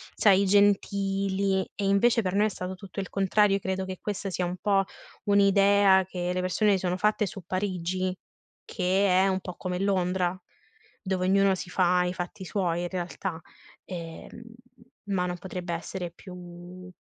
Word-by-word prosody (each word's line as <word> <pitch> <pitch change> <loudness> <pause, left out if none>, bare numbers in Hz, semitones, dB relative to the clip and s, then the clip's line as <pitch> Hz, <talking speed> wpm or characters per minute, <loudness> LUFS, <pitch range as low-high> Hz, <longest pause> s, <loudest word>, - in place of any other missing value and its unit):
sai, 200 -1 +4
gentili 195 -1 +2
e, 200 - -2
invece, 225 +4 +3
per 185 -3 -2
noi 210 - +4
è - - -1
stato 185 -1 -5
tutto 195 +1 -9
il 190 - -3
contrario, 195 +1 +2
credo 190 0 -2
che 185 -1 -6
questa 200 -1 -3
sia 180 0 -2
un 175 +1 -4
po' 195 0 +2 0.4
un'idea 200 -1 +5
che 180 -1 -3
le 180 - -1
persone 205 +3 +2
si 195 - +3
sono 180 0 -1
fatte 210 +2 +2
su 195 0 -7
Parigi 185 -1 -2 0.5
che 190 +2 +1
è 185 +1 +4
un 190 - 0
po' 180 -2 -8
come 180 0 -4
Londra, 185 -2 0 0.6
dove 185 -1 -1
ognuno 195 0 +4
si 180 - -7
fa 180 0 +3
i 180 - -1
fatti 185 +2 -6
suoi, 175 -3 -1
in 175 - -3
realtà, 180 -1 -4 0.5
ehm, 170 +5 -8 0.6
ma 190 -3 0
non 180 0 -3
potrebbe 180 -1 -6
essere 175 +1 -5
più 180 0 -11
190 Hz, 165 wpm, -27 LUFS, 180-195 Hz, 0.6 s, un'idea